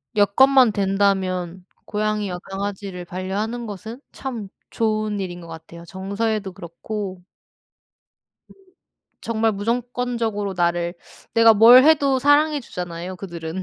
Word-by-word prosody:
여건만 250 +4 +5
된다면 190 -2 0 0.2
고양이와 210 -3 -2
강아지를 195 -2 -5
반려하는 200 +7 -4
것은 220 +4 -8
참 230 -7 -6 0.2
좋은 215 -2 -1
일인 175 -2 -5
것 170 - -11
같아요 165 +1 -11
정서에도 200 +2 -3
그렇고 185 +2 -7 1.8
음...정말 225 -1 -2
무조건적으로 230 -1 -2
나를, 175 0 0 0.4
내가 230 -1 +6
뭘 240 +5 +8
해도 280 -4 +4
사랑해 290 +2 +3
주잖아요 180 -3 -6
그들은. 175 -1 -6
205 Hz, 275 characters per minute, -22 LUFS, 185-230 Hz, 1.8 s, 뭘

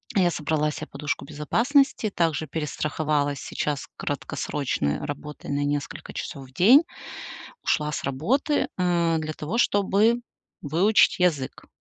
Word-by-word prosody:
Я 180 -3 +4
собрала 150 0 0
се - - -6
подушку 145 +1 -4
безопасности, 235 - +2
также 165 -4 0
перестраховалась 150 -2 -1
сейчас 145 -1 -3
краткосрочной 140 - -2
работой 145 +1 -6
на 140 0 0
несколько 145 0 -3
часов 135 -5 -6
в 130 - -22
день. 245 - +7 0.8
Ушла 150 0 +1
с - - -4
работы, 230 - +1
а, 170 -2 +2
для 155 0 -3
того, 160 +10 -3
чтобы 210 +2 +3 0.4
выучить 180 +11 +4
язык. 155 -8 0
155 Hz, 120 wpm, -25 LUFS, 145-195 Hz, 0.8 s, день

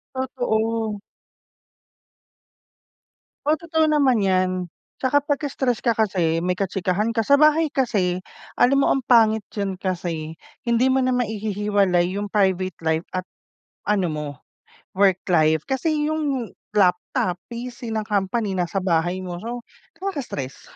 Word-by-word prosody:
Totoo. 225 -4 -1 2.5
Oo, 300 - +4
totoo 320 -1 +1
naman 270 -8 +3
'yan. 185 -1 +2 0.5
Tsaka 285 +2 +2
pagka 290 +1 -1
stress 260 -4 0
ka 235 - +1
kasi 180 -7 +1
may 180 +1 -1
kachikahan 195 +3 -1
ka. 225 - +1
Sa 280 +5 +4
bahay 305 +2 +4
kasi 210 -10 0 0.4
alam 275 +3 +4
mo - - +3
ang 265 -3 +1
pangit 220 -3 +4
'yon 195 -3 -2
kasi 170 -4 -3 0.3
hindi 235 +2 +3
mo 260 - +3
na 255 -1 +2
maihihiwalay 205 -5 +1
yung 205 - -2
private 190 -3 +1
life 160 +1 0
at 185 - 0 0.6
ano 200 -3 +1
mo, 150 -1 -4 0.7
work 190 -2 +3
life. 155 -2 +4
Kasi 300 +2 0
yung 280 -7 -2 0.2
laptop, 180 -1 +1
PC 240 0 -7
ng 220 -1 -1
company 205 +1 0
nasa 180 +2 -1
bahay 175 +1 +1
mo. 175 -1 -6
So, 235 +2 -6 0.4
nakaka-stress. 275 - -5
210 Hz, 130 wpm, -23 LUFS, 185-255 Hz, 2.5 s, Oo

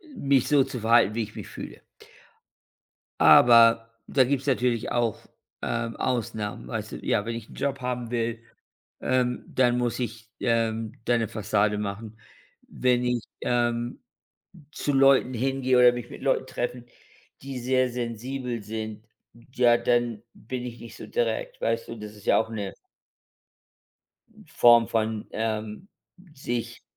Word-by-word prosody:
m 140 - -7
mich 135 -3 +4
so 145 -2 +4
zu 125 - -6
verhalten, 115 -1 +4
wie 115 - 0
ich 105 0 -10
mich - - -7
fühle. - - -9 1.4
Aber 115 -1 +7 0.2
da 135 - +4
gibt's 135 +1 -1
natürlich 125 -4 0
auch, 120 -3 0 0.4
ähm, 115 -1 -2
Ausnahmen. 105 - -3
Weißt 60 - -5
du - - -4
ja, 105 - +1
wenn 115 0 -3
ich 115 -1 -8
'n - - -13
Job 140 -1 -2
haben 125 -2 -3
will, 115 -1 -1 0.6
ähm, 125 -1 0
dann 125 -2 +2
muss 120 0 -1
ich, 115 -2 -5
ähm, 115 -1 0
da 120 - +3
'ne 115 -1 -1
Fassade 105 0 0
machen. 105 +2 -5 0.5
Wenn 125 -1 +1
ich, 125 -2 0 0.2
ähm, 120 0 -1 0.7
zu 145 - -2
Leuten 135 -1 +4
hingehe 130 +1 +1
oder 125 0 +7
mich 120 -1 -6
mit - - -10
Leuten 130 -1 +1
treffe, 120 -1 -4 0.6
die 135 -1 -6
sehr 130 +1 +1
sensibel 120 0 -4
sind, 110 0 -6 0.5
ja, 120 -2 +4
dann 120 -2 0
bin 125 +2 -6
ich 120 -1 -8
nicht 115 - -11
so - - -9
direkt, - - -2
weißt 115 0 -1
du? 115 - -6
Das 105 0 -9
ist 105 - -16
ja - - +4
auch 110 - -2
'ne 105 -4 -5 1.7
Form 120 -1 +5
von, 110 -1 -1
ähm, 110 - -3 0.5
sich 120 -5 -4
120 Hz, 150 wpm, -26 LUFS, 110-125 Hz, 1.7 s, Aber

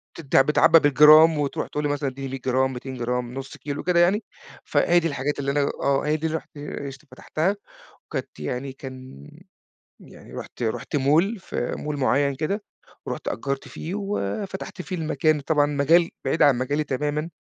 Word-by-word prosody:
بتت 150 -5 -5
بتتعبَّى 150 +4 +6
بالجرام، 155 +2 +7
وترُوح 140 -1 -2
تقول 150 - -3
لي 145 - 0
مثلًا: 145 -1 -1
"ادِّيني 135 +1 -7
100 135 - -4
جرام، 130 +1 +1
200 130 +1 -7
جرام، 125 0 -2
0.5 135 +1 -7
كيلو 145 0 -5
وكده 175 -1 +2
يعني."، 195 +5 +3 0.4
فهي 175 0 +3
دي 165 - -1
الحاجات 145 -1 -2
اللي 140 0 -1
أنا 145 +1 +1 0.2
آه، 140 +1 +1
هي 155 +1 +1
دي 160 +1 -2
اللي 160 - -1
رُحت 155 - -13
اشت 140 0 -7
فتَحتها. 185 +6 -1 0.5
وكانت - - -6
يعني 130 +1 -4
كان 130 - -10 0.7
يعني - - -15
رُحت - - -8
رُحت 115 +5 -2
mall، 160 +11 +2
في 120 - -4
mall 150 -1 -4
معيَّن 140 +1 +2
كده، 165 +9 -2 0.4
ورُحت - - -4
أجَّرت 135 +3 -3
فيه 170 +4 -6
وفتَحت 195 - -4
فيه 185 0 -5
المكان. 155 -1 +1
طبعًا 145 0 +2
مجال 155 +4 +3
بعيد 160 - +1
عن 140 -4 +5
مجالي 145 +4 -1
تمامًا 150 +4 -2
145 Hz, 175 wpm, -24 LUFS, 135-160 Hz, 0.7 s, بالجرام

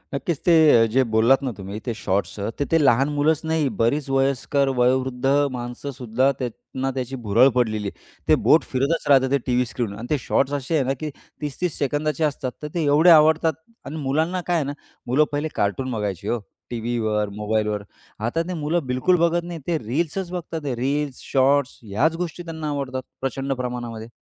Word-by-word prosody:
नक्कीच. 145 +4 -2
ते 175 - +5 0.4
जे 130 +3 +4
बोललात 115 +5 +4
ना 130 - -1
तुम्ही 100 +2 -6
ते 120 - -1
शॉट्स 100 +2 -1
अ, 100 - -2
तर 145 - +1
ते - - +6
लहान 135 +3 +4
मुलंच 150 +2 +2
नाही 160 -3 +2
बरीच 135 +5 +1
वयस्कर, 140 +1 +1
वयोवृद्ध 125 +1 +1 0.3
माणसंसुद्धा 125 +1 -1
त्यांना 130 +2 -4
त्याची 130 +1 -3
भुरळ 115 +6 +5
पडलेली 110 -4 0
आहे. - - -8 0.3
ते - - +6
बोट - - +6
फिरतच 140 +6 0
राहतात 135 -2 +5
ते 140 - +4
टीव्ही 125 0 +2
स्क्रीनवर 110 -5 -3
आणि 115 +3 -7
ते - - +2
शॉट्स 140 +1 +1
असे 140 +5 -2
आहे 145 - +3
ना 130 +1 0
की 155 - -2 0.3
30-30 150 +3 -3
सेकंदाचे 150 +2 0
असतात, 140 -4 -1
तर - - -2
ते 170 - 0
एवढे 150 +4 +5
आवडतात. 160 +1 +4 0.3
आणि 140 - -6
मुलांना 160 +7 0
काय 175 - +2
आहे 160 -4 +1
ना, 140 - -3 0.3
मुलं 130 +5 +4
पहिले 145 +2 -1
कार्टून 130 +6 -1
बघायची 105 -6 -3
हो, 120 - 0 0.3
टीव्हीवर 110 -3 -1
मोबाईलवर 105 -1 -1 0.4
आता 165 +8 0
ते 180 - -3
मुलं 160 +1 0
बिलकुल 130 +9 +2
बघत 170 0 +1
नाहीत. 170 -2 -7
ते 170 -2 +1
रील्सच 165 - -2
बघतात 170 -2 -4
ते 135 -4 -2
रील्स 140 +2 -2
शॉर्ट्स, 140 +1 +2
ह्याच 115 +11 +1
गोष्टी 175 0 -6
त्यांना 160 -2 -5
आवडतात 135 -3 -3 0.2
प्रचंड 135 +1 -2
प्रमाणामध्ये. 120 -3 -5
135 Hz, 185 wpm, -23 LUFS, 120-150 Hz, 0.4 s, ते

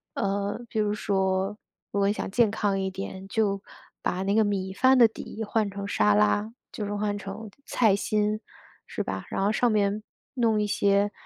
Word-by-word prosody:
呃， 200 +1 -1
比 - - -5
如 210 -1 +2
说 190 -1 0 0.3
如 200 - -1
果 200 - +3
你 - - +2
想 - - -4
健 230 -1 +3
康 205 -2 0
一 190 - -1
点， 190 0 -7
就 200 -2 0 0.4
把 185 +1 -1
那 200 +1 +1
个 220 - +5
米 195 -2 -1
饭 260 +6 +5
的 240 -2 +8
底 220 0 -8
换 210 -1 0
成 200 0 -5
沙 105 - +3
拉， 105 - +2 0.2
就 210 - -5
是 205 - -3
换 205 0 -1
成 205 +2 -7 0.2
菜 220 -5 +3
心， 210 +1 0 0.5
是 - - -4
吧。 - - -4
然 - - -2
后 205 - +3
上 240 +1 +2
面 210 0 +1 0.3
弄 230 -5 +2
一 210 - 0
些 200 0 +2
205 Hz, 210 characters per minute, -27 LUFS, 195-215 Hz, 0.5 s, 的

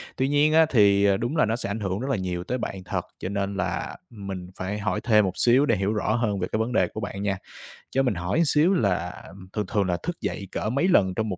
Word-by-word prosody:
Tuy 130 - 0
nhiên 145 +2 +3
á, 160 0 +6
thì, 100 -5 +4
ờ, 100 -1 +4
đúng 120 +9 -2
là - - +4
nó 110 +1 0
sẽ 115 - -4
ảnh 100 +3 -3
hưởng 95 -2 -2
rất 130 +4 -3
là 135 - +1
nhiều 90 -2 -3
tới 125 - -2
bạn 95 -6 -5
thật, - - -3
cho 95 - -4
nên 100 0 -2
là - - -2
mình 100 -5 -7
phải 95 +3 -3
hỏi 100 -1 -1
thêm 105 -3 +4
một 95 - -2
xíu 125 +4 +4
để 115 - +2
hiểu 100 +2 0
rõ 110 0 0
hơn 110 -4 0
về 90 - -1
cái 110 - 0
vấn 110 +2 -1
đề - - +3
của - - -7
bạn 100 -1 -5
nha. 100 -1 0 0.5
Cho 135 - +2
mình 125 -6 +1
hỏi 90 - 0
xíu 155 +5 +3
là 90 - -1 0.3
thường 105 -1 -1
thường 105 -4 +1
là 90 -1 0
thức 175 0 -4
dậy 100 - -4
cỡ 105 - -2
mấy 140 +9 +1
lần 95 - +4
trong 110 -1 -1
một 95 - -3
105 Hz, 275 wpm, -25 LUFS, 95-125 Hz, 0.5 s, á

